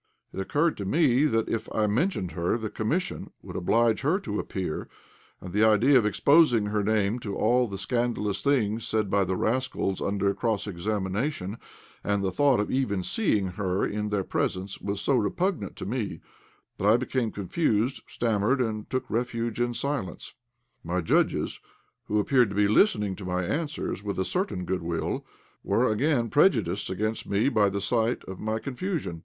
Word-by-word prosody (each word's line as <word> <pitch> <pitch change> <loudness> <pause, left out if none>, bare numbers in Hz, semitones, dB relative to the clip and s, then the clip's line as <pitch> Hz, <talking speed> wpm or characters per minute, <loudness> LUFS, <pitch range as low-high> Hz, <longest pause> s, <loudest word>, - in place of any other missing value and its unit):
It - - -5
occurred 150 - +1
to 100 - -4
me 140 - +3
that 115 -6 +1
if 115 0 -3
I 110 - +2
mentioned 105 - 0
her, 85 +6 0
the 110 -2 -5
Commission 165 +12 -2
would - - -9
oblige 115 +5 +2
her 155 +8 +2
to 105 - -3
appear; 90 -5 -4 0.5
and 90 -1 -9
the 105 +2 +3
idea 110 +6 +5
of 115 -5 +5
exposing 135 -1 +4
her 105 0 0
name 105 +2 +1
to 100 -4 -5
all 120 +3 +2
the 100 -2 -6
scandalous 105 -1 -1
things 115 -6 +1
said 110 -3 0
by 100 0 +3
the 95 0 -1
rascals 120 -4 -1
under 100 0 0
cross 110 -2 -1
examination, 100 - -2 0.4
and 100 -1 0
the 95 - 0
thought 140 +3 +3
of 105 - -1
even 105 -8 0
seeing 105 - +1
her 95 0 -1
in 105 0 -2
their 105 -2 0
presence, 95 +1 -2
was 100 0 -3
so 140 - +1
repugnant 125 - -1
to - - -6
me 110 0 -3 0.6
that 100 - +1
I 110 +3 +6
became 125 -2 -1
confused, 110 - 0
stammered, 115 +3 +1
and 110 -4 -2
took 130 - -2
refuge 115 0 -2
in 120 0 0
silence. 140 -9 -3 0.5
My 85 +2 -1
judges, 80 - +1 0.5
who 105 - 0
appeared 125 +1 +3
to 100 - -6
be 105 0 +4
listening 105 - +3
to 100 - -8
my 90 0 -1
answers 150 - -3
with 100 -1 -3
a 95 - 0
certain 180 - -2
good 90 +1 -2
will, 85 0 -3 0.4
were 115 +5 +2
again 120 0 +1
prejudiced 110 - +2
against 110 +4 -2
me 100 +6 +2
by 105 -5 +3
the 100 +1 -2
sight 115 +3 0
of 95 - -8
my 110 +1 -1
confusion. 135 - -4
110 Hz, 175 wpm, -27 LUFS, 100-125 Hz, 0.6 s, I